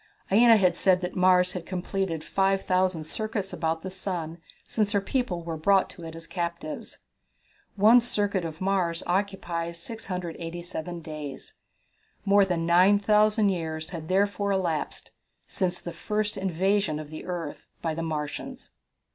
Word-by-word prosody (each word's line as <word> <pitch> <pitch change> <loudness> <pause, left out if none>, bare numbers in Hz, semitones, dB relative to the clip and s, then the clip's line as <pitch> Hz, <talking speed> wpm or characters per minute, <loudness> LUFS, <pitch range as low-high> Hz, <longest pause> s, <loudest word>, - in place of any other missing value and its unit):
Aina 230 +2 +7
had 180 -4 +3
said 185 0 +3
that 180 0 -4
Mars 180 0 +4
had 180 -2 -5
completed 180 -2 -2
5,000 185 -3 +1
circuits 210 +3 -4
about 160 0 -1
the 190 - -5
sun 175 -3 -4 0.3
since 210 -2 0
her 200 - +4
people 195 -5 -2
were 165 -1 -4
brought 195 +4 +3
to 170 - -11
it 165 0 -7
as 165 0 -9
captives. 170 -3 -4 0.8
One 215 +4 +7
circuit 205 -5 -1
of 160 0 -6
Mars 185 -3 +1
occupies 175 -3 -2
687 175 -4 -5
days. 150 -4 -7 0.7
More 200 0 +5
than 175 -3 -1
9,000 205 +4 +4
years 160 -3 -3
had 165 -3 -6
therefore 200 +2 +1
elapsed 175 -6 -2 0.3
since 180 -1 -1
the 175 - -7
first 210 +4 -2
invasion 190 -2 +1
of 155 -1 -8
the 155 - -7
earth 170 -5 -5 0.2
by 165 -2 0
the 165 - -3
Martians. 150 -3 -5
180 Hz, 140 wpm, -27 LUFS, 165-195 Hz, 0.8 s, Aina